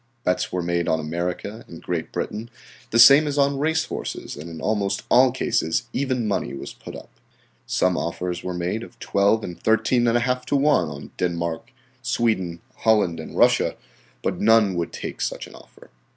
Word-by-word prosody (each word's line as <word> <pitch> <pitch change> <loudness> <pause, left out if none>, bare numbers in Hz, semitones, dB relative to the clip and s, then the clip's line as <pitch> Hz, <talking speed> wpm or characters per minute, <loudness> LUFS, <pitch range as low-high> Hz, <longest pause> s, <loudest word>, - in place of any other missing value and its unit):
Bets 90 - 0
were 90 -1 -2
made 85 0 -1
on 80 - +2
America 90 +7 -4
and 85 - -10
Great 85 -2 -4
Britain, 110 +3 -4 0.4
the 115 - 0
same 140 +6 +8
as 145 0 -2
on 140 -1 +2
race 160 +2 +1
horses, - - -5
and 80 +3 -8
in 80 -1 -8
almost 100 -1 -1
all 130 0 +6
cases 80 -9 0
even 130 -4 -1
money 100 -8 -2
was 70 - -7
put - - -10
up. - - -11 0.6
Some 90 -1 +2
offers 90 +1 -3
were 90 -1 -4
made 90 +5 -2
of 120 0 -11
12 100 +1 +2
and 90 - -7
13½ 120 +2 +2
to - - 0
1 140 - +3
on 70 -1 -9
Denmark, 85 +3 -2 0.3
Sweden, 110 -8 0 0.2
Holland 105 -7 +2
and - - -8
Russia, - - +4 0.5
but - - -2
none 110 -2 +5
would 85 -1 -2
take - - -6
such - - -3
an - - -14
offer. - - -17
100 Hz, 175 wpm, -23 LUFS, 85-120 Hz, 0.6 s, same